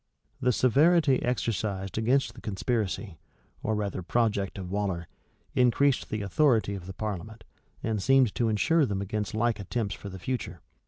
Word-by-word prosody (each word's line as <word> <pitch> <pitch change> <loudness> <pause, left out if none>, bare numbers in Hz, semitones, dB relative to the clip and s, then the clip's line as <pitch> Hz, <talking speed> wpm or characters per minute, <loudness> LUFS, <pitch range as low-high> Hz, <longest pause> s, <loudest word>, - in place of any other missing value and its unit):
[] - - -39
The 125 - +3
severity 140 +4 +4
exercised 105 -5 -2
against 125 +5 +1
the - - -13
conspiracy, 105 -4 -2 0.4
or 110 - 0
rather 100 -3 -2
project 100 0 0
of 90 -2 -6
Waller, 95 -4 -2 0.5
increased 130 +2 +3
the 110 -1 -2
authority 110 -1 +2
of 95 -3 -7
the 95 - -6
parliament, 110 +2 -5 0.4
and 110 -2 -1
seemed 135 -2 +4
to 120 -3 +1
insure 150 +8 +3
them 100 -2 -2
against 105 +1 -3
like 115 0 +1
attempts 100 +1 -2
for 100 - -8
the 95 - -8
future. 95 - -4
110 Hz, 160 wpm, -28 LUFS, 100-125 Hz, 0.5 s, severity